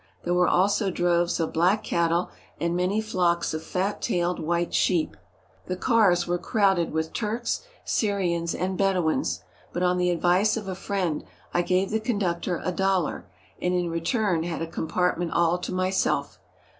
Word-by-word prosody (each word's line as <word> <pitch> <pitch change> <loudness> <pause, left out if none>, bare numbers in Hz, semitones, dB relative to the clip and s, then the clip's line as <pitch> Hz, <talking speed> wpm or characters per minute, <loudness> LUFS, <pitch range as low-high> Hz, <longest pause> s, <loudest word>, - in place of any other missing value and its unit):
There 175 - 0
were 180 0 +4
also 195 +2 +2
droves 175 -1 +1
of 165 - -1
black 180 +6 +2
cattle 170 +1 +1 0.3
and 170 +1 0
many 185 +4 +1
flocks 175 -6 0
of 155 - -3
fat 190 +3 -2
tailed 175 -5 0
white 170 +2 -1
sheep. 170 -4 +1 0.5
The 185 - -2
cars 190 -5 +3
were 175 0 -1
crowded 195 -3 +2
with 160 0 -2
Turks, 230 +2 -2 0.2
Syrians, 175 -6 0
and 185 +1 -2
Bed 195 -1 +3
ouins, 155 - 0 0.3
but 175 - -2
on 180 0 +2
the 180 0 +2
advice 180 +5 +2
of 210 -3 -5
a 190 - -2
friend 185 -4 -2 0.3
I 175 - +3
gave 185 +3 +1
the 220 - +1
conductor 190 -6 -1
a 185 - +1
dollar, 185 - 0 0.3
and 180 0 +1
in 175 -1 0
return 170 +1 0
had 165 -1 -3
a - - -1
compartment 175 +1 -1
all 170 +1 +2
to - - -5
myself. 185 +1 0
180 Hz, 170 wpm, -26 LUFS, 170-195 Hz, 0.5 s, were